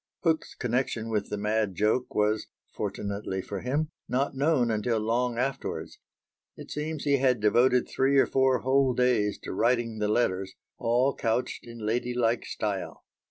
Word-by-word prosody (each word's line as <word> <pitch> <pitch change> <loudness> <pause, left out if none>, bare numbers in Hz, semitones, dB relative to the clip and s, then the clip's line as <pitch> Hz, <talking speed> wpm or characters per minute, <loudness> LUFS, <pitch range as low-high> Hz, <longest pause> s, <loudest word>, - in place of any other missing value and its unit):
Hook's 160 -2 0
connection 120 -2 -1
with 105 -2 -1
the 105 - -3
mad 105 -1 0
joke 110 +6 0
was, 105 +1 +1 0.3
fortunately 100 -1 -3
for 100 +1 -5
him, 145 - -1 0.2
not 135 +3 0
known 135 -3 +2
until 110 +2 0
long 115 +2 0
afterwards; 135 +2 -3 0.6
it - - -10
seems 150 0 -3
he 140 -1 +3
had 130 -3 +2
devoted 120 +4 +3
three 135 +1 +2
or 135 - +6
four 130 -1 +2
whole 130 -1 +2
days 120 -5 +2
to - - -5
writing 115 +1 +1
the 105 - +1
letters, 95 -4 0 0.2
all 125 +4 +2
couched 120 0 -2
in 115 -2 -8
ladylike 120 +1 0
style. 100 -3 -4
120 Hz, 155 wpm, -28 LUFS, 105-130 Hz, 0.6 s, or